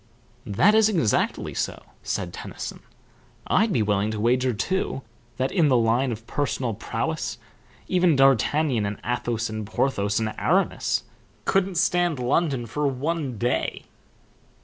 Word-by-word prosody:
"That 175 Hz, -, +4 dB
is 220 Hz, 0 st, +5 dB
exactly 160 Hz, -, 0 dB
so," -, -, -3 dB, 0.2 s
said -, -, -3 dB
Tennyson. -, -, -7 dB, 0.7 s
"I'd 220 Hz, 0 st, +2 dB
be 115 Hz, -, +2 dB
willing 105 Hz, 0 st, +1 dB
to 110 Hz, -1 st, -3 dB
wager 125 Hz, +3 st, +2 dB
too 135 Hz, -, -2 dB, 0.3 s
that, 130 Hz, +1 st, 0 dB
in 170 Hz, -6 st, +3 dB
the 130 Hz, -3 st, +4 dB
line 120 Hz, +3 st, +2 dB
of 115 Hz, 0 st, -6 dB
personal 120 Hz, -2 st, -1 dB
prowess, -, -, -3 dB, 0.5 s
even 180 Hz, -3 st, +3 dB
D'Artagnan 135 Hz, -2 st, +3 dB
and 100 Hz, 0 st, -4 dB
Athos 120 Hz, -1 st, -1 dB
and 110 Hz, 0 st, -4 dB
Porthos 105 Hz, -1 st, 0 dB
and 110 Hz, -1 st, -2 dB
Aramis -, -, +1 dB, 0.4 s
couldn't 195 Hz, -1 st, +1 dB
stand 175 Hz, -1 st, +2 dB
London 130 Hz, 0 st, 0 dB
for 145 Hz, +6 st, -1 dB
one 140 Hz, -1 st, -2 dB
day." 120 Hz, +3 st, -1 dB
130 Hz, 135 wpm, -25 LUFS, 110-155 Hz, 0.7 s, is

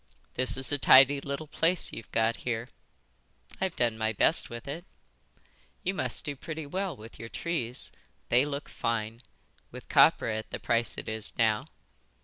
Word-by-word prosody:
"This 130 Hz, +1 st, +2 dB
is 135 Hz, +1 st, +5 dB
a 145 Hz, -, 0 dB
tidy 135 Hz, +1 st, +7 dB
little 140 Hz, +3 st, -5 dB
place 165 Hz, +3 st, +1 dB
you've 110 Hz, -5 st, -9 dB
got 115 Hz, +1 st, +1 dB
here." 120 Hz, 0 st, -4 dB, 0.9 s
"I've 190 Hz, -3 st, -1 dB
done 115 Hz, -2 st, 0 dB
my 110 Hz, 0 st, 0 dB
best 155 Hz, -, +4 dB
with 120 Hz, +2 st, -8 dB
it." 155 Hz, +5 st, -5 dB, 1.0 s
"You 190 Hz, -, 0 dB
must -, -, -2 dB
do 145 Hz, -2 st, -3 dB
pretty 160 Hz, +2 st, -7 dB
well 185 Hz, +1 st, -3 dB
with 110 Hz, +2 st, -13 dB
your 115 Hz, -, -8 dB
trees. 130 Hz, -8 st, -3 dB, 0.4 s
They 125 Hz, +2 st, +5 dB
look 145 Hz, 0 st, -4 dB
fine. 115 Hz, 0 st, -3 dB, 0.5 s
With -, -, -11 dB
copra 110 Hz, -, +4 dB
at 110 Hz, -, -5 dB
the -, -, -5 dB
price 115 Hz, 0 st, 0 dB
it -, -, -6 dB
is 110 Hz, -1 st, -1 dB
now. 110 Hz, -3 st, +1 dB
125 Hz, 165 wpm, -29 LUFS, 115-145 Hz, 1.0 s, tidy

